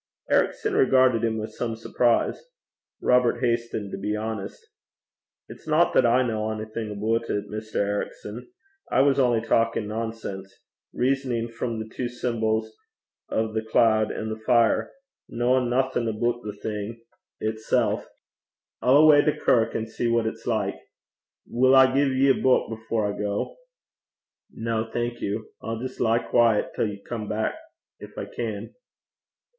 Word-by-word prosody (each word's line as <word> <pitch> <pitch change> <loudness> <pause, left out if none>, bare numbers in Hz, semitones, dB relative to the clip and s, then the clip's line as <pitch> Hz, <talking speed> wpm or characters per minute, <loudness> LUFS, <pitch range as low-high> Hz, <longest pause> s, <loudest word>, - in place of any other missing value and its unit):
Ericson - - +1
regarded 130 -3 +4
him 110 -1 0
with 110 0 -5
some 115 -2 -3
surprise. 120 - 0 0.5
Robert 125 -1 +3
hastened 115 -4 -1
to - - -5
be 105 - -2
honest. 110 -2 -5 0.8
'It's - - -13
no - - +3
that - - +5
I 125 +2 +4
ken 120 - -1
onything 110 0 -3
aboot 110 +3 -1
it, 105 - -2
Mr. 110 0 -7
Ericson. 105 - -3 0.4
I - - +3
was 140 0 +3
only 120 -4 +3
bletherin' 115 - -11
(talking 115 -2 +2
nonsense) 105 -3 -5 0.3
rizzonin' 125 -3 -1
frae 115 -1 -3
the 110 0 -7
twa 125 -2 -2
symbols 110 -2 -1 0.5
o' 110 0 -1
the 110 - 0
cloud 110 -1 +3
an' 110 - -4
the 110 0 -5
fire 115 0 +2 0.4
kennin' 125 +1 +1
nothing 130 -1 0
aboot 120 +2 -1
the 105 - -4
thing 110 +2 -5 0.4
itsel'. 110 0 0 0.8
I'll 140 +4 +6
awa' 150 -2 +7
to 150 - +3
the - - -13
kirk, 115 -2 +2
an' 110 - -1
see 115 +2 -3
what 115 -1 +2
it's 110 - -5
like. - - 0 0.7
Will 130 +2 +4
I 130 0 +9
gie 140 +1 +3
ye 135 +1 +3
a - - +5
buik 130 -2 +2
afore 110 -2 -2
I - - -8
gang?' 105 - -2 0.9
'No, 115 0 -3
thank 120 0 -3
you. 105 +2 -3
I'll 115 0 -4
just 130 +2 -6
lie 115 -1 +3
quiet 115 -2 +2
till 110 - 0
you 100 -1 -7
come 110 -3 -4
back 110 +1 -1 0.5
if - - -12
I - - -3
can.' 110 -2 -5
115 Hz, 155 wpm, -25 LUFS, 110-120 Hz, 0.9 s, I